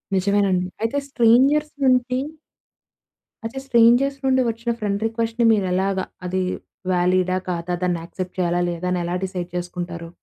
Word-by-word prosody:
నిజవేనండి. 190 -1 +2
అయితే 225 +5 0
స్ట్రేంజర్స్ 275 +5 +3
నుంచి 250 -1 +3 1.3
అయితే, 225 +4 -6
స్ట్రేంజర్స్ 245 +2 +4
నుండి 260 -1 +3
వచ్చిన 230 +1 -2
ఫ్రెండ్ 205 -1 -1
రిక్వెస్ట్‌ని 230 +1 0
మీరెలాగ 190 -1 +1 0.3
అది 185 +1 -1 0.5
వ్యాలిడా 185 +1 +2
కాదా? 175 0 -2
దాన్ని 175 -2 0
యాక్సెప్ట్ 180 +2 -7
చేయాలా 175 0 +1
లేదా? 175 +1 -4
అని 180 - 0
ఎలా 175 +1 -2
డిసైడ్ 180 -2 -5
చేసుకుంటారు? 175 -1 -5
195 Hz, 130 wpm, -22 LUFS, 180-235 Hz, 1.3 s, స్ట్రేంజర్స్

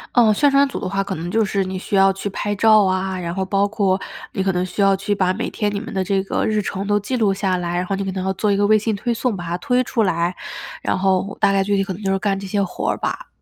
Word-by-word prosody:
呃， 230 -3 +6
宣 285 +7 +3
传 275 0 +4
组 - - -5
的 - - -3
话 195 +1 -1
可 195 - -4
能 170 +1 -5
就 220 +4 +2
是 195 -1 0
你 185 0 -4
需 195 +2 -2
要 195 0 +6
去 195 +1 -4
拍 205 +1 -2
照 215 0 +5
啊， 185 0 -1
然 170 -1 -4
后 190 - -1
包 195 +1 +1
括 200 -3 +1 0.3
你 195 - -2
可 190 0 +1
能 180 +1 0
需 190 +2 -3
要 195 0 +5
去 200 +2 -1
把 185 -2 +1
每 220 +5 -3
天 205 -2 -2
你 - - -2
们 230 +3 -6
的 190 - 0
这 190 +1 0
个 195 - -1
日 215 -1 +1
程 195 0 -4
都 205 0 +3
记 250 +6 -2
录 210 -4 +2
下 195 -1 0
来。 175 -1 -3
然 180 +1 0
后 195 0 -2
你 195 - -2
可 190 - -2
能 185 -1 -3
要 190 - 0
做 210 +2 -1
一 200 - +3
个 205 +1 +2
微 215 +1 +5
信 215 0 -1
推 235 +4 -1
送， 230 -1 -1
把 175 - -6
它 170 +1 -2
推 250 +7 +1
出 235 -2 0
来， 175 -2 0 0.5
然 - - 0
后 190 +1 0
大 - - +4
概 195 0 +2
具 200 +1 +1
体 195 - +2
可 195 - -5
能 190 +3 -6
就 195 -1 0
是 195 - 0
干 195 -1 0
这 195 - -7
些 200 +1 0
活 190 - -4
儿 - - -3
吧。 - - -4
195 Hz, 340 characters per minute, -20 LUFS, 190-210 Hz, 0.5 s, 呃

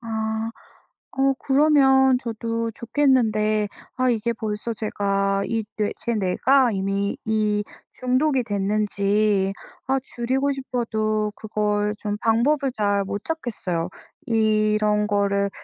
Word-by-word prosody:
아. 220 -1 -3 0.7
어 270 0 +3
그러면 270 -2 +4
저도 230 0 -2
좋겠는데 225 -5 +2 0.3
아 255 0 +2
이게 235 0 0
벌써 220 0 -3
제가 200 -2 0
이 225 -1 -1
뇌 210 -1 0
제 235 - +1
뇌가 240 +6 +3
이미 195 0 -1
이 215 -1 +1 0.3
중독이 255 +1 +1
됐는지 205 -1 +1 0.4
아 265 +1 +2
줄이고 265 +3 -1
싶어도 220 -5 -1
그걸 210 -1 -1
좀 210 -1 -3
방법을 270 +5 +2
잘 205 -1 +1
못 200 +1 -4
찾겠어요. 205 - -3 0.4
이런 215 -1 +2
거를 200 -1 +1
220 Hz, 210 characters per minute, -23 LUFS, 210-250 Hz, 0.7 s, 그러면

